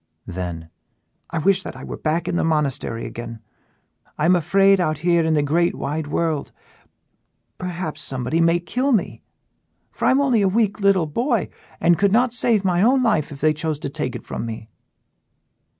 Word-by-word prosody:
Then: 85 -2 -6 0.6
"I 170 - -4
wish 190 +4 +3
that - - -8
I - - -10
were - - -6
back 165 +2 -1
in 175 - -1
the - - +1
monastery 145 -7 -1
again; 115 -1 -7 0.8
I 150 - 0
am 180 +2 +5
afraid 195 +4 +3
out 155 -4 0
here 170 -1 +3
in 160 0 +1
the 150 - +2
great 170 +4 +1
wide 150 +2 -3
world; 155 -1 -1 1.1
perhaps 180 -3 -4
somebody 130 +5 -1
may 165 +1 +3
kill 255 +10 -1
me, 215 - -1 0.7
for - - -4
I - - +5
am 265 - +4
only 260 -6 +2
a 195 - +3
weak 215 +1 +1
little 195 -4 +3
boy 235 - -1 0.3
and 170 0 +3
could 200 -1 +3
not 240 +2 +3
save 225 -4 +2
my 180 -1 +2
own 255 +4 +4
life 155 -10 +1
if 140 - -10
they 155 +1 +3
chose 155 0 -2
to 140 - -5
take 140 -3 -4
it - - -8
from - - -5
me." 110 -1 -7
170 Hz, 185 wpm, -21 LUFS, 150-195 Hz, 1.1 s, am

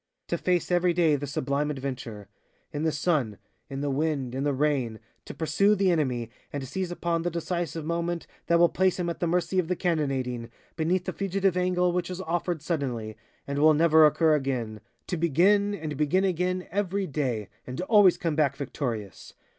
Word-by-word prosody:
To - - 0
face 180 -1 0
every 175 0 +3
day 165 -3 +3
the 145 0 -4
sublime 145 0 -1
adventure, 130 -7 -5 0.5
in 145 - -3
the 160 0 +1
sun, 145 - 0 0.3
in 135 0 -4
the 145 -1 -1
wind, 140 -3 -1
in 135 +1 -2
the 145 - +1
rain, 135 -5 0 0.3
to - - -7
pursue 195 +6 +2
the 190 -2 +2
enemy 125 -8 -1 0.2
and 140 -2 -4
seize 185 +5 -3
upon 170 -1 -1
the 175 - -1
decisive 170 -1 -3
moment 170 +1 -2 0.2
that 170 - +4
will 170 0 +6
place 185 +1 +1
him 175 -1 0
at - - -7
the 175 - 0
mercy 180 +2 +1
of 175 - 0
the 180 - 0
cannonading, 135 -9 -1 0.3
beneath 175 +3 0
the 185 - -3
fugitive 195 +1 0
angle 180 0 +2
which 180 0 -1
is 180 0 -5
offered 175 -2 -2
suddenly, 125 -10 -3 0.3
and 140 0 -3
will 155 +1 +6
never 160 0 +6
occur 160 +1 +3
again, 125 -7 -2 0.2
to 180 - -3
begin, 195 +6 +3
and 155 -5 -5
begin 155 +6 +2
again, 185 0 0
every 200 0 -1
day, 130 - -2 0.2
and 125 0 -6
to 180 - -3
always 200 -4 +6
come 165 -3 -1
back 145 -3 +2
victorious. 120 - -5
160 Hz, 190 wpm, -27 LUFS, 140-180 Hz, 0.5 s, will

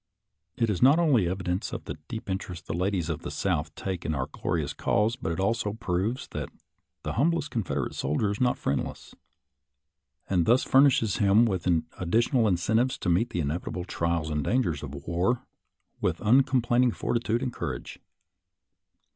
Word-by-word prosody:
It 115 -2 +2
is 90 - -2
not 140 +5 +7
only 140 - +3
evidence 95 0 -2
of - - -5
the - - -4
deep 110 -3 -6
interest 95 -3 -4
the - - -4
ladies 90 0 0
of 80 -3 -3
the - - -5
South - - -1
take 95 -3 -4
in 80 - -1
our 65 -1 -1
glorious - - -2
cause, 110 +3 +1
but 80 - -4
it 85 - -3
also 105 +1 0
proves 105 +4 -2
that - - -5 0.5
the - - -3
humblest 150 +2 +1
Confederate 110 -7 -2
soldier 75 +9 0
is 105 - -4
not 125 -1 +2
friendless, 70 - -3 1.1
and 90 -3 +1
thus 120 +3 +5
furnishes 130 -6 +4
him 105 +3 +5
with 95 -5 -1 0.3
additional 115 - +2
incen 100 +3 +2
tives 130 - -2
to 90 - -2
meet 100 +8 +2
the 85 - -2
inevitable 85 +4 -3
trials 85 -3 -1
and 75 -1 -1
dangers 90 - 0
of 75 -1 -7
war 90 +9 0 0.6
with - - 0
uncomplaining 125 0 +3
fortitude 120 +1 -1
and 125 -2 -2
cour - - -3
age. - - -10
100 Hz, 170 wpm, -27 LUFS, 85-120 Hz, 1.1 s, not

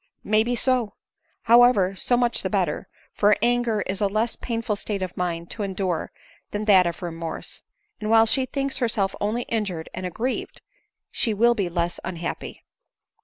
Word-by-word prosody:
" - - -51
May 215 - +6
be 240 +2 0
so. 245 -4 +1 0.5
However, 230 -5 +5
so 245 +5 +2
much 240 -1 +1
the - - -2
better;, - - -1 0.3
for 205 0 +3
anger 240 -3 +2
is 195 +2 -3
a 205 - +3
less 215 +4 -1
painful 230 -3 -3
state 200 -1 -3
of 185 - -5
mind 170 -1 -3
to 220 - -4
endure 190 -4 -2 0.4
than 210 +1 -3
that 190 -4 +6
of 170 +2 -5
remorse; 165 -1 -6 0.4
and 215 - -3
while 225 0 +6
she 260 +3 +3
thinks 275 0 -1
herself 215 -6 0
only 220 +4 -1
bjured 195 -8 -2
and 185 - -4
aggrieved, 235 +9 -4 0.5
she 225 -4 0
will 235 +3 +4
be 200 -6 -1
less 170 0 -2
unhappy." 175 -1 -5
210 Hz, 170 wpm, -24 LUFS, 185-235 Hz, 0.5 s, May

